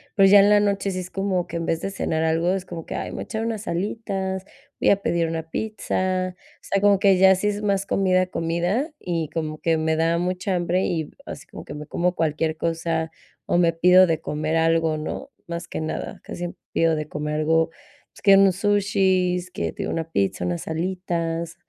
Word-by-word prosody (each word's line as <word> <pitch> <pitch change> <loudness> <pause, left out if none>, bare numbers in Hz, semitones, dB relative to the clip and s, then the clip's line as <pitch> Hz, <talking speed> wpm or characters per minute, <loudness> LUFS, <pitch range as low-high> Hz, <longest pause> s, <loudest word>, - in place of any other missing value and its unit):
pero 195 -2 +6
ya 200 +1 +9
en 200 +1 +6
la 210 0 +6
noche 200 -1 0
sí 185 - -3
es 180 0 -6
como 195 -2 -1
que - - -4
en 165 - -3
vez 165 - 0
de 195 - -3
cenar 160 -4 -1
algo 165 +2 +2
es 190 -1 -3
como 165 -3 -7
que: - - -6
"Ay, - - -4
me - - -7
voy - - -4
a - - -3
echar 220 +1 -3
unas 220 -2 -4
alitas, 190 0 -3 0.4
voy - - +4
a 200 0 +2
pedir 170 -3 +1
una 160 0 -4
pizza", 185 -4 -2
o - - -27
sea, 195 - 0
como 205 -1 +5
que 195 -2 +5
ya 190 +1 +6
si 190 +3 -1
es 205 0 -3
más 200 -1 +1
comida, 185 -2 +2
comida 175 - -1
y 165 -4 -2
como 155 -1 -4
que 165 -1 +1
me 160 0 +1
da 165 +1 +2
mucha 185 +2 -1
hambre 175 +1 +1
y 160 -3 -2
así 140 - -8
como - - -10
que - - -8
me 150 0 -7
como 180 +3 0
cualquier 160 0 0
cosa, 165 -1 -1 0.4
o - - +2
me 170 -1 +3
pido 180 +2 +6
de 160 -2 0
comer 155 +1 -2
algo, 165 -1 +2
¿no?, 210 - -5 0.2
más 170 0 -5
que - - -5
nada, 155 - -4
casi 175 0 -6 0.2
pido 165 -1 +3
de 155 -1 -4
comer 150 0 -3
algo, 160 +1 +2 0.4
pues, - - -17
que 195 -1 +7
unos 195 -2 +5
sushis, 190 -3 +1
que 80 - -3
te - - -5
digo - - -3
una 165 0 -4
pizza, 100 - 0
unas 90 -1 -3
alitas, 170 -1 -2
175 Hz, 220 wpm, -23 LUFS, 165-195 Hz, 0.4 s, ya